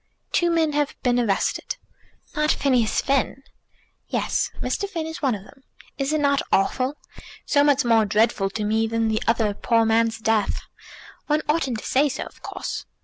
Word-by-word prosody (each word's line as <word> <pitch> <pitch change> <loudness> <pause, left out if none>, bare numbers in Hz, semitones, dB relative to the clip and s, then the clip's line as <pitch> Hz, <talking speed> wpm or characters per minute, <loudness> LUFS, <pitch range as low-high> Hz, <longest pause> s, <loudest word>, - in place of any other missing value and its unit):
"Two 345 - +2
men 325 -2 +2
have 290 -1 0
been 245 -1 +2
arrested." 205 -5 0 0.6
"Not 300 0 +1
Phineas 250 -5 +2
Finn?" 270 0 0 0.6
"Yes; - - 0
Mr. 400 - -2
Finn 335 -5 -3
is 320 +2 -7
one 265 -6 +2
of 195 - -9
them. 270 +6 -18 0.4
Is 275 +1 0
it 310 - +1
not 280 -1 +2
awful? 255 +8 +1 0.5
So 285 - +3
much 285 -2 +3
more 225 -2 +4
dreadful 210 -1 +2
to 210 +2 -4
me 220 +2 +1
than 225 0 0
the 220 0 0
other 225 -2 +2
poor 230 +2 +2
man's 225 0 +2
death! 220 -1 0 0.7
One 305 +1 +1
oughtn't 295 -6 +1
to - - -11
say 285 +3 +3
so, - - -4
of - - -14
course." - - -5
250 Hz, 175 wpm, -23 LUFS, 225-295 Hz, 0.7 s, more